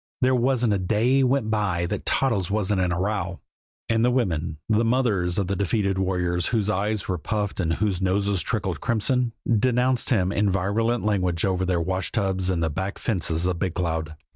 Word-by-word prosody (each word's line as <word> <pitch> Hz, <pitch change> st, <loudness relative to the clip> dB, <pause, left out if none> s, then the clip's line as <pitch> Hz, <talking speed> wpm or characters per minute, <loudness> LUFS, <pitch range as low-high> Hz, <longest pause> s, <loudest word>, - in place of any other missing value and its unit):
There 130 Hz, 0 st, +4 dB
wasn't 125 Hz, -3 st, +2 dB
a 100 Hz, -, 0 dB
day 115 Hz, +8 st, +2 dB
went 130 Hz, -4 st, +1 dB
by 95 Hz, -5 st, 0 dB
that -, -, -4 dB
Toddles 115 Hz, -10 st, +1 dB
wasn't 100 Hz, -2 st, 0 dB
in 90 Hz, -1 st, +1 dB
a 90 Hz, -, -1 dB
row; 95 Hz, -2 st, -2 dB, 0.5 s
and 115 Hz, 0 st, +2 dB
the 125 Hz, -, +4 dB
women, 85 Hz, -10 st, -1 dB
the 110 Hz, +1 st, +2 dB
mothers 115 Hz, -8 st, +1 dB
of 100 Hz, -, +1 dB
the 95 Hz, +2 st, -2 dB
defeated 100 Hz, 0 st, 0 dB
warriors 90 Hz, -2 st, 0 dB
whose 105 Hz, -3 st, 0 dB
eyes 105 Hz, +2 st, -1 dB
were 90 Hz, -2 st, -2 dB
puffed 105 Hz, +5 st, -3 dB
and 85 Hz, -3 st, +1 dB
whose 95 Hz, -1 st, -1 dB
noses 100 Hz, 0 st, +1 dB
trickled 95 Hz, -8 st, -2 dB
crimson, 120 Hz, +2 st, +1 dB, 0.2 s
denounced 125 Hz, +2 st, +2 dB
him 95 Hz, -6 st, +2 dB
in 105 Hz, 0 st, +1 dB
virulent 105 Hz, +5 st, 0 dB
language 90 Hz, -5 st, +1 dB
over 95 Hz, -1 st, 0 dB
their 90 Hz, -2 st, +1 dB
washtubs 95 Hz, +1 st, -1 dB
and 85 Hz, -3 st, 0 dB
the 80 Hz, -, +1 dB
back 95 Hz, +6 st, -3 dB
fences 85 Hz, -6 st, -1 dB
of 90 Hz, -2 st, -1 dB
Big 90 Hz, -2 st, -2 dB
Cloud. 80 Hz, -3 st, -2 dB
100 Hz, 190 wpm, -24 LUFS, 90-115 Hz, 0.5 s, There